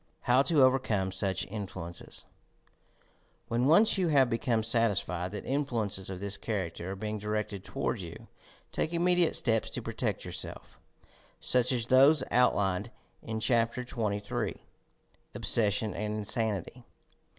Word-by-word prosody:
HOW 125 +2 +4
TO 145 -1 +4
OVERCOME 115 -8 +2
SUCH 95 0 -1
INFLUENCES 95 -5 -7 1.2
When 120 +2 +1
once 205 +6 +5
you 180 - +2
have 135 -5 +4
become 115 -1 0
satisfied 100 -6 +1
that 105 - -6
influences 115 -9 -1
of 95 -1 -5
this 100 0 -1
character 95 -5 -4
are - - -6
being 105 +2 -4
directed 105 -2 -3
toward 130 -4 -3
you, 85 -2 -9 0.4
take 160 - -2
immediate 175 0 +2
steps 115 -3 +1
to - - -4
protect - - -3
yourself - - -6 0.3
— - - -28 0.2
such 125 0 +3
as 120 -3 0
those 135 +5 +5
out 125 +1 +4
lined 100 +2 -1 0.3
in 110 0 -4
Chapter 115 +2 +1
XXIII, 105 -4 -3 0.7
"Obssession 105 -1 +2
and 105 0 -3
Insanity." 110 +1 -2
110 Hz, 135 wpm, -30 LUFS, 100-130 Hz, 1.2 s, once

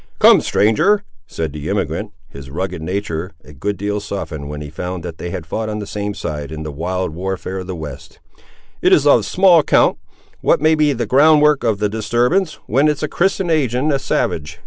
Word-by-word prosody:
"Come, - - +7
stranger," 195 - +2 0.2
said 80 -3 -4
the 75 +1 -6
emigrant, - - -2 0.2
his 70 -1 -11
rugged 90 +3 -4
nature 90 0 -3
a 75 - -14
good 100 +9 -3
deal 105 +1 -2
softened 85 -8 -6
when 75 0 -6
he 75 -1 -8
found 90 +2 -5
that 85 -2 -7
they 85 - -5
had 85 -1 -5
fought 110 +7 -3
on 105 - -3
the 105 - -5
same 105 0 -4
side 75 -5 -5
in 80 0 -6
the 75 - -5
wild 90 +3 -3
warfare 95 +2 -4
of 90 - -7
the 95 - -4
west, 75 -4 -9 0.6
"it - - +3
is 145 - +4
of 130 -6 +5
small 185 -3 +5
account, 150 - +3 0.4
what - - +2
may 155 +2 +4
be 155 -2 +3
the 120 -3 -2
ground 150 +6 +5
work 150 -3 +3
of 110 -4 +1
the 105 +1 0
disturbance, 120 - 0
when 135 +7 +2
it's 150 0 -1
a - - +1
Christian 185 +2 0
ag'in 140 -1 +1
a 140 - +1
savage. 80 - -2
100 Hz, 210 wpm, -18 LUFS, -, 0.6 s, Come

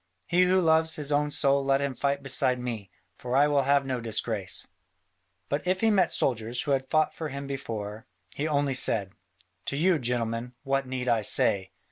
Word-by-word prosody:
He 180 +1 +3
who 185 +1 +3
loves 160 -1 +3
his 150 -1 -1
own 145 +1 +1
soul 140 -1 +2
let 135 0 +2
him 140 -1 -2
fight 140 +1 -1
beside 130 -2 +2
me: 115 -6 -5 0.3
for 125 0 -3
I 145 +2 +5
will 145 -1 +2
have 140 +1 +2
no 130 -2 -3
disgrace." 110 -3 -3 0.8
But 145 +5 -3
if 185 0 +1
he 225 -1 +3
met 185 -5 +3
soldiers 120 -1 -1
who 145 - -2
had 130 -1 0
fought 155 0 +2
for 160 - -5
him 140 0 -6
before, 110 -6 -6 0.3
he 150 - -2
only 145 -2 0
said, 100 -6 +2 0.5
"To 140 - -3
you, 170 +1 +3
gentlemen, 120 -1 -2
what 135 -1 -1
need 130 -1 -4
I 115 -2 +2
say? 100 -2 +2
135 Hz, 190 wpm, -27 LUFS, 120-145 Hz, 0.8 s, I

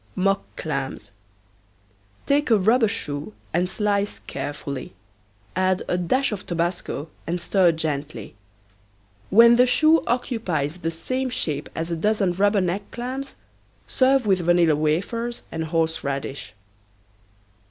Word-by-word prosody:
MOCK 195 +1 +2
CLAMS. 135 -8 -4 1.1
Take 290 +1 +2
a 225 - +6
rubber 220 +4 +4
shoe 155 -3 -5 0.2
and 180 +2 +1
slice 205 -1 0
carefully. 140 -6 -6 0.6
Add 185 0 +1
a - - 0
dash 240 +11 +1
of 205 -3 -4
tobasco 170 -3 -2 0.2
and 175 +2 -1
stir 180 0 +3
gently. 150 -8 -4 1.0
When 235 +3 +7
the 250 +1 +5
shoe 315 +5 +4
occupies 185 - -1
the 165 -2 -2
same 255 +11 -3
shape 155 - -2
as 165 +1 -3
a - - 0
dozen 200 +1 +1
rubber 200 +2 +2
neck 185 +3 -2
clams 260 +3 -5 0.5
serve 265 -1 +3
with 190 -3 +3
vanilla 175 -2 +3
wafers 200 +11 -1
and 160 0 -3
horseradish. 155 -5 -2
180 Hz, 120 wpm, -23 LUFS, 160-230 Hz, 1.1 s, When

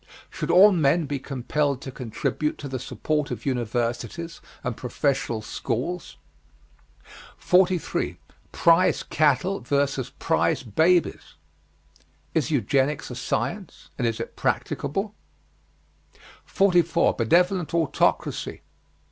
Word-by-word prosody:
Should - - -4
all 195 +4 +8
men 160 -2 +2
be 140 -1 -3
compelled 135 +1 -1
to 135 - -6
contribute 130 +5 -3
to 145 - -7
the 130 -1 -4
support 150 +4 -2
of - - -6
universities 120 +5 -2 0.2
and 125 -2 -2
professional 125 -3 -1
schools? 135 +11 -4 1.2
43. 180 -1 +1 0.3
PRIZE 170 +2 +3
CATTLE 170 +6 +1
VS. 140 -2 -1
PRIZE - - +1
BABIES. 160 - +1 1.0
Is 160 -2 +1
Eugenics 135 +1 0
a - - -6
science? 190 - -4
And 120 - +1
is 115 -1 -2
it - - -6
practicable? 195 +8 -2 1.3
44. 175 -4 +3
BENEVOLENT 175 - +2
AUTOCRACY. 165 -4 0
145 Hz, 100 wpm, -25 LUFS, 130-175 Hz, 1.3 s, all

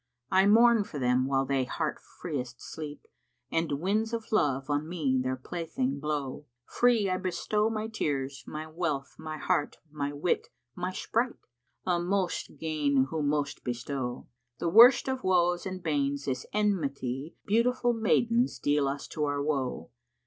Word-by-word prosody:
I 190 +1 +5
mourn 230 +1 +6
for 185 -7 -8
them[FN#61] 125 0 +2
while 135 0 +1
they 135 -1 +1
heart 150 +5 -2
freest 125 -7 -6
sleep 150 -2 -8 0.2
* - - -48
And 165 -2 0
winds 205 +9 0
of 225 -1 -4
love 135 -10 +2
on 145 +2 -1
me 145 -7 +1
their 130 0 -1
plaything 140 -2 -3
blow: 145 -1 -3 0.2
Free 240 -4 +3
I 185 -1 0
bestow 200 +4 0
my 215 -1 -2
tears, 140 -10 -2
my 155 +1 -5
wealth, 155 -5 -3
my 155 -1 -5
heart 145 -1 0
* 155 - -34
My 140 0 0
wit, 145 +4 0 0.3
my 180 +1 -2
sprite:Â 175 - -3
most 185 0 -1
gain 145 -4 +1
who 160 -1 -1
most 145 0 -1
bestow! 125 +1 -4 0.3
The 170 - -1
worst 235 +9 +8
of 265 -1 -2
woes 175 -1 +2
and 185 -1 -6
banes 140 -3 0
is 130 - -2
enmity 150 -9 -1
* - - -57
Beautiful 240 +3 +2
maidens 230 +2 +2
deal 145 -1 +1
us 140 +1 -3
to 150 -2 -1
our 145 0 -1
woe. 130 - -2
155 Hz, 160 wpm, -29 LUFS, 140-190 Hz, 0.3 s, worst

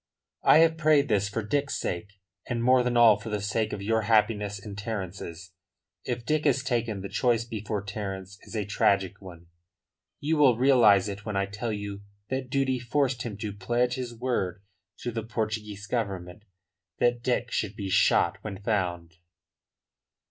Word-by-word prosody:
"I - - +6
have 160 0 -2
prayed 155 -4 +4
this 100 -2 +2
for 110 +2 -3
Dick's 140 +6 -1
sake, 90 +4 -4 0.3
and 115 -1 -2
more 130 +1 +5
than 125 -1 0
all 115 -3 +7
for 115 +1 -7
the 105 -1 -1
sake 105 +2 -1
of 100 - -5
your 110 +2 +1
happiness 105 -2 +2
and 100 +1 -9
Terence's. 95 -4 -6 0.5
If 120 -1 -3
Dick 155 +3 +1
is 135 -1 +2
taken 115 -5 -1
the 100 - -5
choice 120 +1 +1
before 110 -3 -4
Terence 95 -2 -6
is - - -11
a 105 -2 -1
tragic 100 -1 +1
one. 85 -3 -11 0.7
You 155 +2 0
will 135 -6 +5
realise 115 -7 +5
it 100 0 -6
when 105 -2 -3
I 100 - +1
tell 105 +4 -4
you 100 -1 -5 0.3
that 130 -1 -2
duty 130 -1 +1
forced 125 0 0
him 110 -5 -5
to 105 -1 -4
pledge 120 +5 0
his 125 -2 -5
word 100 -7 -2 0.4
to 120 - -3
the 115 0 -3
Portuguese 110 -2 -4
Government 100 -4 -4 0.5
that 120 0 +2
Dick 125 -1 -1
should 105 -1 -2
be 100 -3 -4
shot 95 - +3
when 100 -3 -5
found." 85 -6 -2
110 Hz, 170 wpm, -27 LUFS, 100-120 Hz, 0.7 s, all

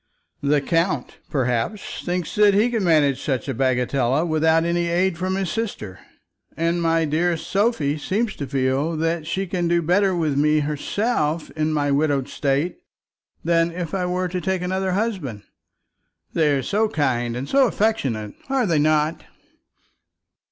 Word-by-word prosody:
The 145 0 +2
count, 165 -2 -1
perhaps, 125 - -2
thinks 180 -2 -2
that 210 -1 +4
he 225 +4 +3
can 225 -4 0
manage 145 -6 +3
such 130 -4 -2
a 135 - -1
bagatelle 130 +3 +1
without 160 +1 +2
any 170 0 0
aid 175 +2 +1
from 185 +2 -2
his 190 -2 -2
sister; 195 - -4 0.6
and 170 +2 0
my 165 -1 +2
dearest 165 +2 0
Sophie 195 -9 0
seems 215 +8 -1
to 140 - -4
feel 135 +4 0
that 165 0 -1
she 190 +4 -1
can 175 -1 -1
do 170 0 +3
better 190 +3 +2
with 155 -5 0
me 150 +1 +3
herself 155 +2 -1
in 155 0 -1
my 145 -2 0
widowed 140 -2 +1
state, 145 - -1 0.6
than 165 0 +2
if 170 -1 -5
I 185 -2 -1
were 180 +1 -1
to 180 +1 -3
take 190 -1 -1
another 190 +1 -1
husband. 185 - -2 0.9
They 155 -3 +3
are 135 - -2
so 215 +2 +1
kind 120 - 0
and 130 +3 -4
so 270 -1 +4
affectionate; 135 - -1 0.2
are 265 -3 +1
they 165 -6 +2
not?" 155 +1 +1
165 Hz, 160 wpm, -22 LUFS, 145-185 Hz, 0.9 s, that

